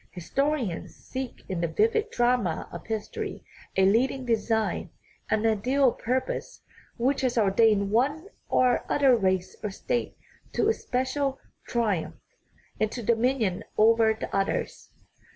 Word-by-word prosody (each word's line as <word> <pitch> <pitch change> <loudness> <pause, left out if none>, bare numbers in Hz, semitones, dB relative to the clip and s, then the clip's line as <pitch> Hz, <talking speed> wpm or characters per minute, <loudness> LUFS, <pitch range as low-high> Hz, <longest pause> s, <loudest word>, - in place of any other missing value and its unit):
Historians 235 - -2
seek 260 -1 -7
in 185 -3 -3
the 170 - +1
vivid 225 - +1
drama 240 - +1
of 170 - -9
history 220 -1 -4 0.3
a 190 - +5
leading 255 +6 +2
design, 225 -1 0 0.4
an 220 0 +1
ideal 250 +5 +3
purpose, 260 - -3 0.3
which 265 +4 +1
has 250 -2 0
ordained 205 -1 +3
one 285 - +1 0.2
or 250 -1 +3
other 275 -3 +5
race 190 -4 0
or 210 - -1
state 240 +5 -3 0.4
to - - +2
a 445 - +4
special 265 - -1 0.3
tri 215 -8 +1
umph, - - -11 0.6
and 215 0 +1
to 240 - -5
dominion 230 -4 +1
over 225 +1 +5
the - - -4
others. 195 0 -2
230 Hz, 135 wpm, -27 LUFS, 205-260 Hz, 0.6 s, a